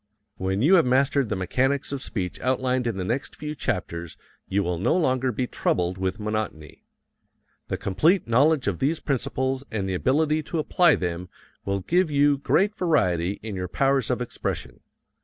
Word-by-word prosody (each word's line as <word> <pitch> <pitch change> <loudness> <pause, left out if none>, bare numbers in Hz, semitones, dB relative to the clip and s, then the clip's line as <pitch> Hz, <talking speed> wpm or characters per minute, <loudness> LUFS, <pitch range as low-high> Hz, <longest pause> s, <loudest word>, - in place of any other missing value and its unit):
When 95 +3 -1
you 165 +7 +5
have 170 - +4
mastered 135 -1 +2
the 105 - -1
mechanics 130 +11 0
of 140 -2 -3
speech 95 -8 -3
outlined 130 -1 0
in 115 -4 -2
the 95 - -3
next 120 +8 -2
few 150 0 -5
chapters 90 - -3 0.3
you 100 +1 0
will 90 -1 -2
no 100 - +2
longer 130 -6 +1
be 125 +3 -1
troubled 90 -5 -1
with 95 +2 -2
monotony. 105 -8 -4 0.8
The - - -2
complete 160 - +2
knowledge 140 +4 +3
of 95 -5 -1
these 155 +4 +1
principles 130 -1 -1
and 100 -3 -2
the 95 - -2
ability 150 - +1
to 160 +2 -5
apply 165 +1 +4
them 90 0 -4 0.4
will 100 0 -1
give 175 - +2
you 145 -1 +3
great 200 +8 +2
variety 95 - +1
in 110 -3 -5
your 90 -1 -3
powers 135 +4 +1
of 125 -1 0
expression. 120 - -5
125 Hz, 175 wpm, -25 LUFS, 95-140 Hz, 0.8 s, you